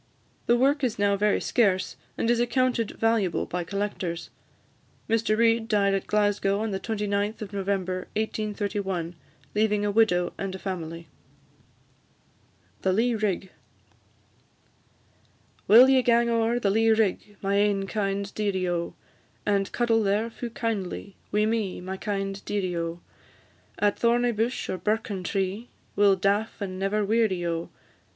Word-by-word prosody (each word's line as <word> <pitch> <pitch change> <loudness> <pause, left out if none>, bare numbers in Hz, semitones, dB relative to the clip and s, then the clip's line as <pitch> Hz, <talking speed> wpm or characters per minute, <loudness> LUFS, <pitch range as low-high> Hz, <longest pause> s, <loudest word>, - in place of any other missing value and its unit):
The 240 - +5
work 280 +3 +2
is 245 -4 0
now 200 0 +2
very 210 +1 +2
scarce, 195 -6 +1 0.2
and - - 0
is 240 0 +3
accounted 245 -2 +1
valuable 225 -6 +1
by 180 0 -3
collectors. 190 -2 -4 0.8
Mr 225 -1 +1
Reid 230 0 +3
died 200 -3 +2
at 195 - -2
Glasgow, 205 -1 +1
on 220 -1 -2
the 190 - -2
29th 210 0 -2
of 205 - -9
November 190 -2 -2
1831, 205 -5 -2 0.4
leaving 210 -1 +1
a 205 - +1
widow 190 -5 +2
and 195 -1 -3
a - - -5
family. 165 -4 -5 1.7
THE 190 - +2
LEA 235 +5 +2
RIG. 200 -4 -1 2.2
Will 240 +5 +9
ye 265 -1 +5
gang 235 -1 +3
o'er 230 +1 +2
the 200 -4 +1
lea 225 +2 +3
rig, 210 -1 -1
My 200 +1 +1
ain 200 -1 +2
kind 200 -1 -2
dearie, 195 -3 -1
O! 170 -1 -2 0.5
And 200 -1 +1
cuddle 230 -2 +2
there 210 +3 0
fu' 240 +1 -6
kindly 205 -4 -4 0.2
Wi' 210 +1 +2
me, 220 -4 -1
my 185 +1 -5
kind 195 -1 -3
dearie, 190 -4 -2
O! 170 0 -3 0.8
At 205 -1 +1
thorny 240 +1 +3
bush, 230 +3 -1
or 185 - -3
birken 210 -1 -1
tree, 195 +4 -2 0.3
We 205 - +2
'll 195 -1 +6
daff 200 +4 0
and 185 -2 -4
never 205 +2 0
weary, 210 -5 +1
O! 165 0 -2
205 Hz, 145 wpm, -26 LUFS, 195-225 Hz, 2.2 s, Will